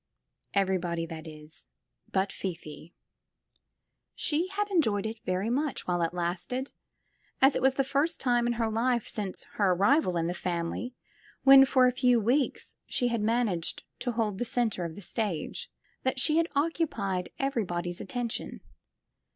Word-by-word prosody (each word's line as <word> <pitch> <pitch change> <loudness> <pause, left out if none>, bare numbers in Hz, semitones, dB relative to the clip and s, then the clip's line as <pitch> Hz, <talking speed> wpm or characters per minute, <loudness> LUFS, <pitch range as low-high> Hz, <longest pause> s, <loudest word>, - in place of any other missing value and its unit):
Everybody, 180 -4 +1
that 160 -1 -8
is, 155 0 -12 0.4
but 190 0 +1
Fifi. 170 -3 -7 1.2
She 320 +4 +1
had 410 +2 -2
enjoyed 220 - +2
it 220 +1 -4
very 185 +5 0
much 285 +2 -1
while 175 -1 0
it 165 - +1
lasted, 180 +9 -3 0.7
as 270 +1 +5
it - - 0
was 265 0 +3
the 275 - +2
first 285 +5 0
time 240 -2 +2
in 240 - +1
her 225 -1 -1
life 235 +1 +1
since 200 -3 -4
her 195 -3 +4
arrival 195 - +3
in 165 - 0
the 175 - -1
family, 180 +8 -3 0.5
when 270 0 +9
for 260 -1 +4
a 250 - +4
few 250 -1 +3
weeks 250 +6 0
she 245 - +1
had 235 -2 -1
managed 215 -6 0 0.2
to 245 - -2
hold 215 -4 -1
the - - +1
center 225 -7 0
of 160 -1 -6
the 205 - -8
stage, 205 -5 -2 0.3
that 260 0 0
she 305 - +3
lad 330 0 +3
occupied 275 - 0
everybody's 175 -10 -2
attention. 245 -4 -4
225 Hz, 155 wpm, -29 LUFS, 180-260 Hz, 1.2 s, when